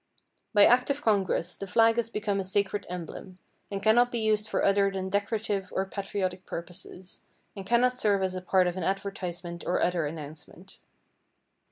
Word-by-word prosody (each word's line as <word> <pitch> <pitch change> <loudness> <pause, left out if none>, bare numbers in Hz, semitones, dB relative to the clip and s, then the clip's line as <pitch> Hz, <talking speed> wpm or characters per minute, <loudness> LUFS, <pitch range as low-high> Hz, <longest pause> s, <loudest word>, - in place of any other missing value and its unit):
By 205 -2 +7
act 250 +2 +4
of 280 +1 -1
Congress, 195 -5 +1
the 195 - -7
flag 225 +4 +4
has 230 -1 0
become 210 -3 -1
a - - -1
sacred 200 +1 -1
emblem, 180 +1 -7 0.3
and 200 -1 -4
cannot 240 +3 +4
be 240 - -2
used 215 -1 +1
for - - 0
other 200 0 +4
than 190 -1 -4
decorative 200 -1 -1
or 190 - +1
patriotic 190 -2 -4
purposes, 180 +1 -8 0.3
and 195 -1 -8
cannot 250 +2 +3
serve 200 -2 +2
as 185 -1 -1
a 185 - -4
part 185 0 +3
of 180 0 -1
an 185 - -3
advertisement 180 -2 -4
or 180 - 0
other 175 -4 +1
announcement. 155 +4 -10
195 Hz, 175 wpm, -28 LUFS, 180-215 Hz, 0.3 s, By